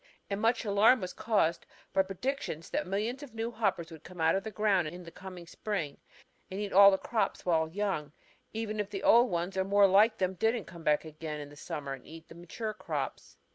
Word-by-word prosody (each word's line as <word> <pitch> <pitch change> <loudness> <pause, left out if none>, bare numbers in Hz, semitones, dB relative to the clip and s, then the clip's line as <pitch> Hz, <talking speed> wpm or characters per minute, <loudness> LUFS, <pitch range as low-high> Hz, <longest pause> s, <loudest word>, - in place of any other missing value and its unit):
And 200 +1 -1
much 230 +1 +2
alarm 210 +5 +5
was 185 -2 -5
caused 170 -7 +1 0.3
by 190 - +5
predictions 195 - -4
that 195 - -1
millions 215 +8 -2
of 265 -6 -11
new 225 +1 -2
hoppers 190 -7 -1
would 160 -1 -11
come 180 -2 -12
out 160 0 +4
of 195 - 0
the 220 - -4
ground 200 -4 +2
in 175 +3 -8
the 170 - -10
coming 185 0 -10
spring 170 -5 -4 0.5
and 190 - -5
eat 205 -1 -3
all 200 +1 +10
the 190 - +2
crops 225 +2 -1
while 160 -3 +2
young, 185 -5 -2 0.4
even 215 -1 -3
if 205 -1 -2
the 195 -1 -5
old 240 +2 +6
ones 175 +1 -2
or 190 - +3
more 200 +1 +5
like 205 +4 +5
them 185 0 0
didn't 225 +3 0
come 170 -2 -11
again 155 0 -1
in 145 -1 -7
the 145 - -14
summer 145 -1 -5
and 135 - -10
eat 160 0 -12
the - - -10
mature 185 +6 -5
crops. 215 - -5
190 Hz, 215 wpm, -31 LUFS, 165-215 Hz, 0.5 s, all